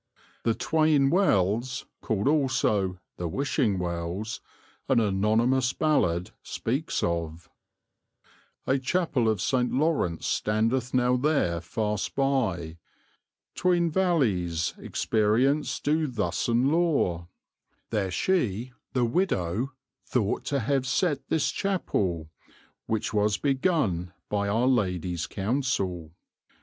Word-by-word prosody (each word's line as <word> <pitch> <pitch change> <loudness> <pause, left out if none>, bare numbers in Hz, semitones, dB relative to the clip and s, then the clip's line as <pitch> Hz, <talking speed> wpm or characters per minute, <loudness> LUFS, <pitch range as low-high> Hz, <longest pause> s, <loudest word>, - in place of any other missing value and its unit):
The 115 -1 +1
'Tweyne 155 -3 +2
Wells,' 125 - +1 0.2
called 105 0 -1
also 130 -10 +1 0.2
'the 90 - -3
Wishing 130 - 0
Wells,' 90 +4 -3 0.5
an - - +4
anonymous 115 +5 +2
ballad 90 - +1
speaks 135 +8 -2
of: 85 -1 -3 1.1
A 135 +1 +2
chappel 130 -5 +1
of 110 -3 0
Saynt 125 +5 +1
Laurence 140 - 0
standeth 115 +4 0
now 125 0 +3
there 125 - +1
Fast 105 +3 -2
by, 105 - 0 0.7
tweyne 175 -2 +2
wallys, 105 - +1
experience 115 +7 +1
do 155 +1 +1
thus 105 -9 -2
and 120 +4 +2
lore; 145 - +1 0.6
There 105 -4 0
she 125 - 0 0.2
(the 125 -2 +2
widow) 115 - 0 0.3
thought 110 -5 0
to 140 -2 0
have 135 +3 0
sette 145 -1 0
this 160 - +1
chappel, 95 - -1 0.6
Which 110 -1 -1
was 105 -2 +2
begun 130 - 0 0.2
by 100 -1 0
our 115 +5 +1
Ladie's 90 -8 0
Counsel. 95 - -2
115 Hz, 105 wpm, -27 LUFS, 95-140 Hz, 1.1 s, an